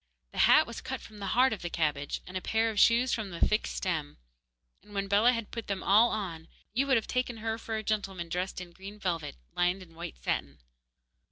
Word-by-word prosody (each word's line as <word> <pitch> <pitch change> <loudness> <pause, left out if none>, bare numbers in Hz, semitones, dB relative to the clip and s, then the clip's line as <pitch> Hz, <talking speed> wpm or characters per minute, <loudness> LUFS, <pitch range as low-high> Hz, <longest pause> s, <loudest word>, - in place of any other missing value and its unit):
The - - -6
hat - - +7
was - - -7
cut - - -4
from 210 -1 -13
the 200 - -4
heart 255 -1 +5
of 210 - -6
the 175 - -3
cabbage, 150 -4 -1
and 185 - -10
a 185 - -1
pair 225 +3 +1
of 210 - -2
shoes 235 +2 +5
from 220 -3 -2
the 170 -2 -7
thick 215 +1 +2
stem. 160 -6 -2 0.6
And 205 - -15
when 195 0 -1
Bellah 205 +5 +5
had 230 -3 -4
put 230 -2 -5
them 200 -2 -2
all 220 +4 +6
on 170 -6 -4 0.3
you 270 +4 +1
would 265 - +4
have 225 - -1
taken 250 -2 -1
her 225 +1 -2
for 225 0 -4
a 220 - -2
gentleman 195 -5 -2
dressed 180 +3 -2
in 180 -1 -8
green 195 +4 -10
velvet, 170 - -2 0.2
lined 180 +2 +1
with 175 -3 -13
white 165 - -7
satin. 70 +3 -2
200 Hz, 230 wpm, -30 LUFS, 175-225 Hz, 0.6 s, hat